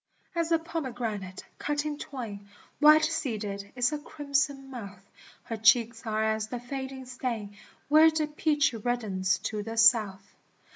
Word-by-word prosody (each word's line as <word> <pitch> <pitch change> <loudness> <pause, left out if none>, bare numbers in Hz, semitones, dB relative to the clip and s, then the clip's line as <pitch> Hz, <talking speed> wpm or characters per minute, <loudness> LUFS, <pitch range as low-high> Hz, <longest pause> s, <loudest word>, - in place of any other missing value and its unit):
As 335 -1 -1
a 330 - +5
pomegranate, 245 - -5
cut 295 0 -1
in 300 -1 -3
twain, 220 -9 -7 0.3
White 305 +1 +7
seeded, 215 -11 -3
is 245 +1 +2
her 300 - -3
crimson 280 -2 -2
mouth, 200 -6 -9 0.4
Her 225 - -5
cheeks 230 +2 +3
are 215 0 0
as 220 0 0
the 245 +2 -5
fading 265 +1 -6
stain 235 -5 -4 0.3
Where 310 +2 +7
the 315 -1 0
peach 300 -1 +1
reddens 215 -5 -1
to 215 -1 -2
the 225 +2 -6
south. 215 -4 +4
245 Hz, 145 wpm, -28 LUFS, 215-295 Hz, 0.4 s, White